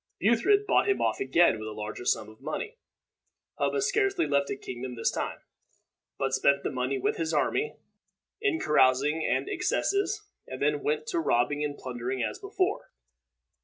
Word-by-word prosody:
Buthred 305 - +3
bought 415 - +3
him 395 - +2
off - - 0
again 175 - +3
with 110 - -6
a 110 - -5
larger 105 +3 -6
sum 110 - +1
of 110 +3 -15
money. 440 - -5 0.8
Hubba 420 - +1
scarcely 395 -6 +2
left 140 0 +1
the - - -3
kingdom 125 -1 -6
this 115 - 0
time, - - -4 0.8
but 135 -1 -1
spent 140 +1 +3
the - - -1
money 130 +1 -1
with 130 - -1
his 160 -1 -1
army, 410 - 0 0.7
in 400 -7 +1
carousings 150 - +3
and - - 0
excesses, 400 +2 0 0.2
and 130 - -7
then 145 0 +1
went 150 +1 -1
to - - 0
robbing 145 0 +1
and 145 -1 -3
plundering 125 0 -3
as - - -3
before. - - -1
145 Hz, 165 wpm, -28 LUFS, -, 0.8 s, Buthred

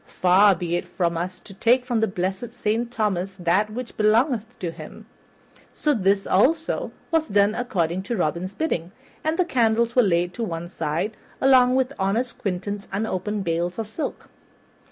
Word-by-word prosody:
Far 190 +2 +4
be 175 -1 -2
it 175 - -5
from 175 -1 -1
us 180 +2 -4
to 200 - -12
take 245 +6 +3
from 240 -3 0
the 220 - +2
blessed 190 +6 -3
Saint 235 +1 -1
Thomas 195 -5 -1
that 185 +4 +1
which 235 +3 -7
belongeth 225 +2 +2
to 175 -3 -3
him." - - -11 0.7
So 300 - +1
this, 195 -3 +2
also, 315 - +1 0.2
was 325 -1 +2
done 205 -1 +3
according 185 -8 -1
to 235 - 0
Robin's 175 +3 -2
bidding, 185 - -2 0.3
and 315 +1 0
the 365 - +3
candles 235 -4 +2
were 250 - +7
laid 175 -4 +1
to 235 - -4
one 170 -4 -4
side, 170 +6 -2 0.2
along 255 -1 +5
with 260 +1 +1
honest 220 +6 -1
Quentin's 200 +1 -3
unopened 205 0 -2
bales 170 +1 -1
of 225 - -2
silk. 220 +9 -5
205 Hz, 170 wpm, -24 LUFS, 180-240 Hz, 0.7 s, were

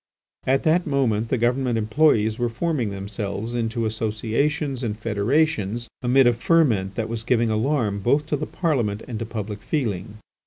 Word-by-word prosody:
At 135 +1 +2
that 165 +2 +2
moment 115 -6 +1
the 130 - +1
government 120 +1 +1
employees 110 -1 +2
were 120 0 +1
forming 125 -1 -1
themselves 100 +3 -4
into 115 -1 -1
associations 115 +6 -1
and 110 -4 -2
federations 115 +1 0
amid 130 +1 +4
a 120 - +5
ferment 115 - +2
that 110 -1 -2
was 115 -1 -4
giving 115 -1 +1
alarm 110 -2 0
both 140 +8 +2
to 155 - -1
the 150 +1 -3
Parliament 120 - -1
and 115 -4 -5
to 115 - -4
public 105 -2 -5
feeling. 110 - -2
115 Hz, 160 wpm, -23 LUFS, 110-135 Hz, -, a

